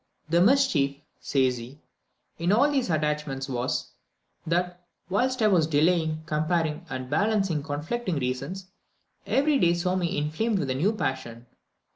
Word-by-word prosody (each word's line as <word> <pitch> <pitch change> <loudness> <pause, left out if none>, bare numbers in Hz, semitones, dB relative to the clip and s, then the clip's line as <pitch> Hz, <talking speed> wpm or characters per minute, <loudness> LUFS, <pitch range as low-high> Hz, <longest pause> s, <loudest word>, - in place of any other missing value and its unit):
"The 170 +1 +4
mischief," 190 - +3 0.2
says 130 -3 +1
he, 125 +5 -10 0.6
"in 170 +3 +1
all 265 +8 +4
these 270 -7 0
attachments 150 -3 -1
was, 125 -1 -2 0.6
that 175 +1 -1 0.3
whilst 255 +4 +1
I - - +6
was 175 -6 +3
delaying, 160 0 +1
comparing 155 +1 -1
and 130 0 -5
balancing 195 +1 +1
conflicting 160 +8 -3
reasons, 140 +8 -3 0.6
every 275 +6 +2
day 170 -4 +4
saw 180 +1 0
me 175 -2 -1
inflamed 160 +10 0
with 140 -7 -1
a - - +1
new 165 +11 +1
passion." 130 - -4
165 Hz, 140 wpm, -26 LUFS, 145-195 Hz, 0.6 s, I